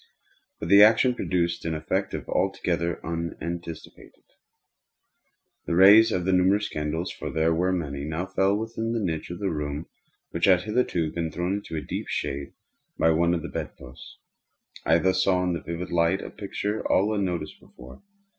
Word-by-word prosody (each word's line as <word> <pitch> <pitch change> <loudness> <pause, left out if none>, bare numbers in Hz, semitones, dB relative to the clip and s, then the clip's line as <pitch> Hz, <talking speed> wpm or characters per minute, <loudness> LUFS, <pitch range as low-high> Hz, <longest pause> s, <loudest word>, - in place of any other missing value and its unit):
But - - -5
the 100 +1 +8
action 115 +4 +6
produced 85 -7 -1
an 80 -1 -2
effect 75 0 -2
altogether 85 0 -1
unanticipated. 85 0 -6 1.4
The 85 - 0
rays 100 +5 +8
of 90 -1 -1
the 95 - +2
numerous 95 +3 +3
candles 75 +3 -3
(for - - -6
there 80 +1 +1
were 90 +3 +1
many) 70 -6 -3
now 80 +4 -3
fell 95 +1 +1
within 115 +1 -3
a - - 0
niche 80 -7 -3
of 85 - -6
the 95 0 -2
room 75 0 -4 0.5
which 85 - 0
had 90 -2 +4
hitherto 105 -8 0
been 85 -1 -3
thrown 90 +4 -1
into 80 -6 -5
deep - - -5
shade 70 +1 -4 0.4
by 80 - +4
one 85 +2 +2
of 85 - -4
the - - -4
bed - - -5
posts. 65 -1 -13 0.7
I 80 - +5
thus 95 +2 +2
saw 90 -1 +2
in 85 -3 -1
vivid 85 +1 -5
light 85 +3 +2
a - - -8
picture 105 +1 -4
all 105 +3 +3
unnoticed 90 -6 -3
before. 65 +1 -15
85 Hz, 165 wpm, -25 LUFS, 80-95 Hz, 1.4 s, the